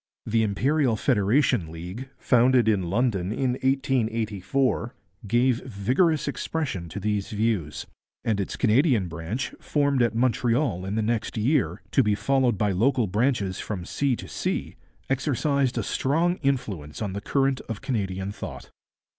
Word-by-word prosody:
The 115 +1 +2
Imperial 125 +5 +1
Federation 110 - +2
League, 90 +11 -7
founded 125 -1 +4
in 95 -6 +1
London 100 -3 0
in 130 +3 0
1884, 125 -3 0 0.3
gave 120 +3 +2
vigorous 130 - +1
expression 135 - -3
to 100 - -5
these 105 0 -1
views; 105 -8 -1 0.4
and 110 -3 0
its 100 - -3
Canadian 120 - +3
branch, 85 +10 -4
formed 140 -3 +1
at 120 -2 +2
Montreal 120 - +1
in 100 - -2
the 110 - +1
next 115 0 -1
year, 130 +6 +1
to 135 - +4
be 105 -4 +2
followed 125 +2 +1
by 105 0 +1
local 115 +5 +2
branches 105 -2 0
from 95 -5 -4
sea 140 +4 0
to - - -9
sea, - - -3 0.3
exercised 135 0 0
a - - 0
strong 170 +6 +1
influence 105 - -2
on 100 -4 -3
the 100 - -4
current 135 +3 +1
of 115 - -4
Canadian 95 -5 -2
thought. - - -8
115 Hz, 145 wpm, -25 LUFS, 100-135 Hz, 0.4 s, founded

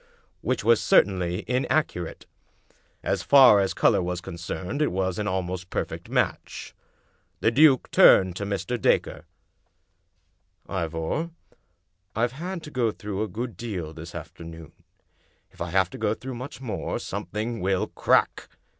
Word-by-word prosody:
" - - -42
Which - - -1
was 115 +1 +4
certahily 90 -1 +2
inaccurate. 125 - -1 0.8
As - - 0
far 130 -7 +7
as 95 -1 0
color - - +3
was 90 0 -2
concerned 90 - -5
it 150 - +2
was 95 0 -1
an 105 - -2
almost 90 -1 -3
perfect - - -4
match. - - -2 0.7
The 110 - +2
duke 140 0 +5
turned 95 -2 +6
to 100 - -3
Mr. 100 +4 -3
Dacre. 75 - +1 0.8
" 90 +1 -46 0.2
Ivor, 80 - -2 0.9
I've 115 +2 +1
had 170 +5 -6
to 150 - -9
go 125 -4 +1
through 105 -1 -5
a 110 - 0
good 115 +3 -5
deal 90 -7 -5
this 80 +2 -10
after 85 +2 -9
noon. 80 -1 -10 0.8
If - - -16
I 85 - -2
have 95 +1 +2
to - - -9
go 105 - +1
through 130 +2 -7
much 125 +3 -7
more, 125 -5 -3
something 110 +2 -4
will 95 0 +1
crack!" - - +1
95 Hz, 150 wpm, -25 LUFS, 90-120 Hz, 0.9 s, far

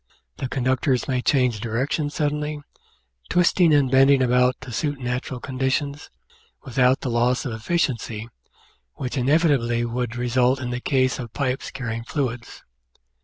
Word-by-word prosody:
The 130 - -4
conductors 130 0 0
may 125 -2 0
change 125 -5 +2
direction 130 +7 -1
suddenly, 150 0 -2 0.7
twisting 175 -1 +4
and 140 -4 +3
bending 135 0 +5
about 125 +1 +2
to 130 -1 -8
suit 145 +4 -2
natural 125 0 -3
conditions, 135 +3 -2 0.5
without 130 +1 +2
the 130 - -2
loss 120 +1 +1
of 125 - -3
efficiency 115 -4 -2 0.7
which 125 0 -4
inevitably 130 -4 +2
would 120 0 -3
result 125 +2 +1
in 125 -1 -4
the 125 0 -3
case 130 -2 +1
of 120 -3 -7
pipes 130 -2 -2
carrying 115 -2 -5
fluids. 120 -3 -4
130 Hz, 135 wpm, -23 LUFS, 120-140 Hz, 0.7 s, bending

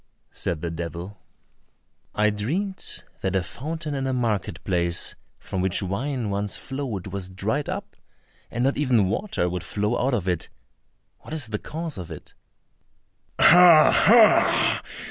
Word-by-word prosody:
said 80 -3 -3
the 85 -1 -3
devil. 85 +4 -6 1.0
"I 105 0 +3
dreamed 175 - -2 0.2
that 95 0 -1
a 95 - +1
fountain 155 - -5
in 135 -1 -2
a 130 - -1
market 115 -6 -2
place 85 -2 +1 0.2
from 95 - -4
which 95 0 +1
wine 115 +4 -3
once 100 0 -2
flowed 130 -9 -5
was 95 -1 -5
dried 110 +10 -2
up, - - -6 0.5
and 120 - -2
not 135 +2 +1
even 125 -9 +2
water 185 - -1
would 90 -1 -4
flow 105 +8 -1
out 130 0 +1
of 95 -5 -3
it; 90 -3 -2 0.7
what 160 - -8
is 140 -8 -2
the 105 -1 -3
cause 160 - -6
of 90 - -8
it?" - - -11 1.0
"Oh, 170 -2 +8
ho! 225 +1 +5
105 Hz, 145 wpm, -24 LUFS, 95-145 Hz, 1.0 s, Oh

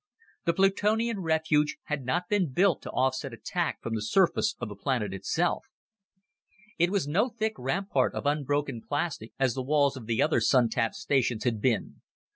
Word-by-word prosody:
The 170 - +3
Plutonian 210 +4 +2
refuge 155 -2 +1
had 150 -3 -3
not 175 +8 -1
been 190 -7 +1
built 180 +3 +2
to - - -8
offset 130 0 -1
attack 175 +8 -3
from 115 - -3
the 110 - -1
surface 190 - +2
of 120 - -4
the 105 - -8
planet 105 -3 -1
itself. 170 - -1 1.1
It 175 +1 +4
was 195 -6 0
no 200 - +2
thick 220 -1 -2
rampart 135 0 0
of - - -4
unbroken 145 -3 0
plastic 145 -6 -3
as 135 -3 +2
the 135 - -3
walls 140 +1 +2
of 120 -4 -9
the 115 -1 0
other - - +3
Sun 120 +1 +4
tap 115 -1 -1
stations 125 -5 0
had 115 -4 -1
been. 125 -2 -1
145 Hz, 175 wpm, -28 LUFS, 125-175 Hz, 1.1 s, It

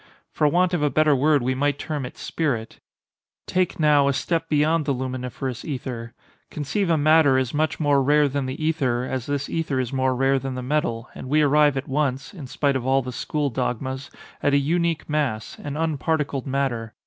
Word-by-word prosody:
For 150 - +2
want 180 +3 +2
of 175 - +1
a 150 - +2
better 155 0 +3
word 145 0 +3
we 130 +1 +1
might 145 +2 0
term 150 -5 -4
it - - -13
spirit. 125 -9 -3 0.7
Take, 185 -1 0
now, 150 -2 +4
a 140 - +2
step 165 +5 -1
beyond 155 +1 +2
the 140 - +1
luminiferous 130 -1 -4
ether—conceive 135 - -5
a 165 - +3
matter 155 -2 +5
as 130 -2 -1
much 155 +1 0
more 145 -3 +3
rare 145 +2 +4
than 140 -1 -2
the 130 - -4
ether, 140 -6 0
as 130 -1 -4
this 145 0 -2
ether 155 -5 -1
is 130 0 -2
more 130 -1 +1
rare 135 +1 +2
than 135 0 -5
the 125 - -4
metal, 125 -4 -1
and 130 - -8
we 150 +2 +4
arrive 145 -1 +4
at 135 - -4
once 135 -1 -1
(in 155 -9 -8
spite 140 +1 0
of 130 - -1
all 135 +1 +2
the 125 - -5
school 145 +4 -2
dogmas) 130 +2 -3 0.3
at 145 0 +2
a - - +6
unique 165 +3 0
mass—an 145 -1 -3
unparticled 150 -3 -1
matter. 130 -5 -2
140 Hz, 195 wpm, -23 LUFS, 130-150 Hz, 0.7 s, a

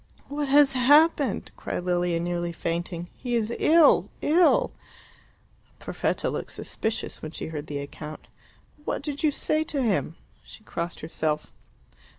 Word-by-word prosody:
"What 290 0 -2
has 280 0 +5
happened?" 285 -1 +4
cried - - -4
Lilia, 175 -1 +1
nearly 175 0 -2
fainting. 170 +1 -3
"He 245 -2 -3
is 230 0 0
ill 320 -2 +5
ill." 340 +4 +4 1.1
Perfetta - - -2
looked - - -4
suspicious 220 0 -3
when 155 - -5
she 160 - -6
heard 150 -2 -6
the 145 - -4
account. 150 +2 -8 0.6
"What - - -3
did 285 -1 -4
you 310 - +4
say 310 +2 0
to 285 -3 -1
him?" 195 -7 0 0.3
She 215 - -13
crossed 170 -4 -5
herself. 155 -1 -2
210 Hz, 140 wpm, -26 LUFS, -, 1.1 s, has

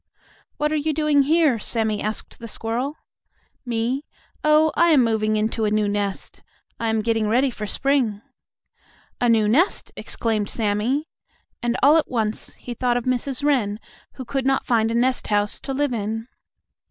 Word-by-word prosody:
"What 300 0 0
are - - +1
you 305 +1 0
doing 300 -1 +3
here?" 300 -4 +3
Sammie 220 -1 0
asked 215 +1 -5
the 230 - -7
squirrel. 235 +6 -3 0.7
"Me? 240 +4 -1 0.4
Oh, 305 +1 +4
I 340 - +4
am 290 -6 +5
moving 215 -1 +1
into 220 +1 -1
a 210 - +2
new 210 0 +1
nest. 205 -1 -3 0.4
I 230 - 0
am 220 -1 0
getting 225 -1 +1
ready 255 +4 +2
for 215 -2 -6
spring." 260 -5 0 1.0
"A 245 - +2
new 220 -2 +4
nest!" 310 - +2
exclaimed 215 -3 -2
Sammie, 225 +8 -1 0.5
and, 240 0 0
all 295 +4 +7
at 320 - 0
once, 220 -3 -2
he 245 - -8
thought 245 0 0
of 245 - -2
Mrs. 255 +2 -2
Wren, 230 -8 +1 0.3
who 260 - -8
could 265 +1 -2
not 270 0 +1
find 225 -2 +2
a 230 - -1
nest 255 +2 +1
house 205 0 0
to 275 - -6
live 280 -1 0
in. 225 +1 -3
235 Hz, 170 wpm, -22 LUFS, 215-275 Hz, 1.0 s, all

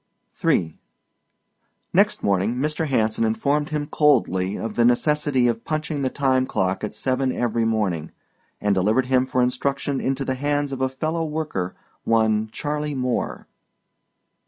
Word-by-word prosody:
III 80 -2 +1 1.1
Next - - +3
morning 100 +4 +1
Mr. 150 +4 -1
Hanson 115 -4 +1
informed 140 +7 +1
him 150 -1 -2
coldly 100 - +2
of 115 -1 -4
the 120 - +2
necessity 130 +1 +2
of 115 -1 -1
punching 155 -1 -2
the 130 - +1
time 130 -1 +1
clock 95 +1 -1
at 105 0 -4
seven 130 +3 0
every 115 -2 0
morning, 100 -8 0 0.5
and 105 -1 +1
delivered 105 +7 +2
him 130 0 +2
for 125 -1 +1
instruction 135 +2 -1
into 135 +1 -1
the 130 - 0
hands 145 +1 -1
of 135 -1 -4
a 130 - +2
fellow 155 +5 -2
worker, 150 - -3 0.3
one 110 -1 +2
Charley 150 +1 -3
Moore. 125 -2 -2
130 Hz, 145 wpm, -23 LUFS, 110-145 Hz, 1.1 s, Next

